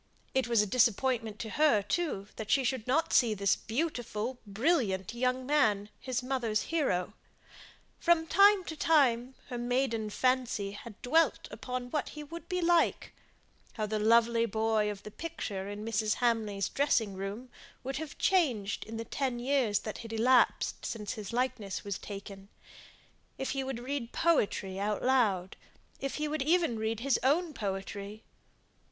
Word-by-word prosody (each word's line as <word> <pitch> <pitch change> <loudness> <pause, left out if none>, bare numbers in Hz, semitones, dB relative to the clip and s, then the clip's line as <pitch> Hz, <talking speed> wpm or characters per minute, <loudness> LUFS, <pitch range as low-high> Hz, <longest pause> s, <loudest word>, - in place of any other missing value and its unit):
It 265 -1 +1
was 230 -3 +4
a - - -1
disappointment 230 0 +1
to 220 - -5
her, 295 -10 +3
too, 205 - -1
that 215 -1 -6
she 270 - +3
should 255 -2 -1
not 300 +6 +1
see 230 -4 +4
this 200 -1 +2
beautiful, 240 -3 -3
brilliant 210 - 0
young 255 +1 0
man, 215 -8 +2
his 255 -1 -3
mother's 245 -5 0
hero. 215 - 0 0.9
From 340 -2 +3
time 395 +3 +5
to 320 - -6
time 265 -6 +3
her 245 -2 -4
maiden 240 -3 0
fancy 255 -4 0
had 205 +1 -10
dwelt 320 +6 +2
upon 250 -1 -5
what 300 - -1
he 300 - -8
would 335 +5 -9
be 360 -1 -1
like; 340 -1 +2 0.6
how 215 - -2
the 215 0 -2
lovely 230 +1 +4
boy 220 0 +1
of 205 -1 -6
the 210 - -9
picture 205 -11 -5
in 205 +1 -6
Mrs. 215 -1 0
Hamley's 215 -5 0
dressing 240 -8 +1
room 200 +6 -6 0.3
would 270 +1 -3
have 310 -1 -6
changed 255 - +1
in 225 0 -7
the 230 - -4
ten 260 -2 -2
years 245 -4 +1
that 215 - -6
had 230 -1 -8
elapsed 240 +3 +2
since 210 -3 -4
the 210 -2 -7
likeness 240 -5 -2
was 200 -1 -4
taken; 200 -1 -9 0.9
if 265 - -2
he 270 -1 -1
would 265 -2 -4
read 250 0 -4
poetry 200 - +1
aloud; 210 -3 +1 0.4
if 275 0 -3
he 300 0 -1
would 305 -1 -2
even 320 -5 +2
read 220 0 -2
his 270 0 +2
own 310 +5 +2
poetry. 200 0 -5
235 Hz, 160 wpm, -31 LUFS, 210-275 Hz, 0.9 s, time